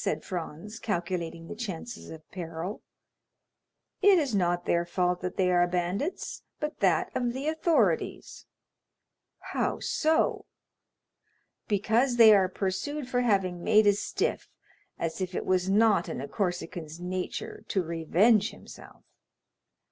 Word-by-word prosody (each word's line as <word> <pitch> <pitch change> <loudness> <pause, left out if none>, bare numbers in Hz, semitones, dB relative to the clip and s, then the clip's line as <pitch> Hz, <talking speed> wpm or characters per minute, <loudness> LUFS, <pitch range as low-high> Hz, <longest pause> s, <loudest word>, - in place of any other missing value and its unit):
said 155 0 -1
Franz, 185 +5 -6
calculating 170 -4 -3
the - - -6
chances 220 0 -6
of 160 -1 -11
peril. 170 +2 -5 1.2
"It 400 -1 +7
is 285 -8 0
not 175 -3 +1
their 170 0 +2
fault 180 +1 0
that 180 0 -4
they 185 -1 +3
are 175 0 +4
bandits, 180 - -2 0.2
but 300 +1 -4
that - - +2
of 240 -1 0
the 270 +3 -4
authorities." 305 - 0 1.1
"How - - 0
so?" 315 0 +1 1.2
"Because 225 +5 +2
they 225 -2 +9
are 190 -2 +4
pursued 225 +10 -3
for 250 -1 0
having 190 -7 +1
made 215 0 +5
a 205 - +6
stiff, 200 - -2 0.5
as 165 +3 -3
if 185 -1 -3
it - - -2
was 185 0 +1
not 210 -3 +3
in - - -4
a 140 - -5
Corsican's 175 -2 -3
nature 180 +1 -4
to 190 - 0
revenge 180 +7 +3
himself." - - -14
190 Hz, 135 wpm, -28 LUFS, 175-225 Hz, 1.2 s, they